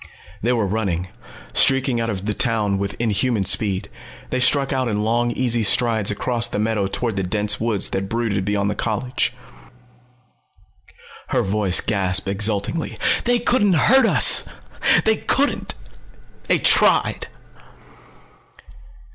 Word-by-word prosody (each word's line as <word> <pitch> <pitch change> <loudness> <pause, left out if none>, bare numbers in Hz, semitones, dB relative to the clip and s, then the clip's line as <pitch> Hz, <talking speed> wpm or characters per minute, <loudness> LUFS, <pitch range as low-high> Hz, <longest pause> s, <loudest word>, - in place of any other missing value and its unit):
They 120 - 0
were 115 -4 0
running, 95 -4 -3 0.4
streaking 130 -3 +2
out 115 - -2
of 100 -3 -5
the 105 - -1
town 105 -5 -1
with 100 0 -4
inhuman 115 -1 0
speed. 95 0 0 0.4
They 130 - -1
struck 135 +1 +2
out 130 -1 -1
in 105 -2 -2
long 120 +2 0
easy 120 -1 -1
strides 110 -1 +2
across 115 +3 +1
the 120 - -5
meadow 105 -2 -1
toward 110 +1 -3
the - - 0
dense 105 +3 0
woods 110 -4 0
that 95 0 -4
brooded 110 -4 -2
beyond 100 0 -1
the - - -2
college. 115 +4 -2 2.0
Her - - 0
voice 95 -2 +1
gasped 95 -2 -1
exultingly. 105 - -2 0.3
"They 245 0 +2
couldn't 230 -4 +1
hurt 235 - +4
us! - - +6 0.6
They 220 -1 +2
couldn't! 285 +1 -1 0.7
They - - +3
tried!" - - +2
110 Hz, 130 wpm, -20 LUFS, 100-125 Hz, 2.0 s, us